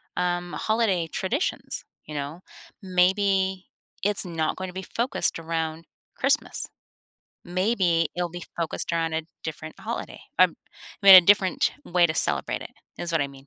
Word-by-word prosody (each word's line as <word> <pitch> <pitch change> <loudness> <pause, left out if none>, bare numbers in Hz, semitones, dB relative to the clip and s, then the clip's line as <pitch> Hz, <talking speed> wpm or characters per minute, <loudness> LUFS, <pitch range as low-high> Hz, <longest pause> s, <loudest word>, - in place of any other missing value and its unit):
um, 175 0 -1
holiday 215 -7 +1
traditions, 230 - -2 0.2
you 150 - -8
know? 145 +4 -4 0.4
Maybe 190 0 +2 0.4
it's 205 -1 +1
not 165 -3 -1
gonna 185 -1 -5
be 190 0 -6
focused 235 -7 0
around 165 0 -3 0.3
Christmas. 275 +3 0 0.8
Maybe 180 -3 +1
it'll 175 -1 -1
be 175 0 -7
focused 170 0 -2
around 165 -1 0
a 160 0 -1 0.2
different 155 0 -7
holiday. - - -5 0.2
I - - +9
m - - -2 0.5
I - - -2
mean, 195 - +12
a - - +12
different 190 0 +3
way 175 -1 +3
to 155 - -3
celebrate 70 - 0
it - - -9 0.3
is 175 -1 -4
what 165 - +2
I 140 - 0
mean. 135 0 -15
175 Hz, 155 wpm, -25 LUFS, 165-190 Hz, 0.8 s, mean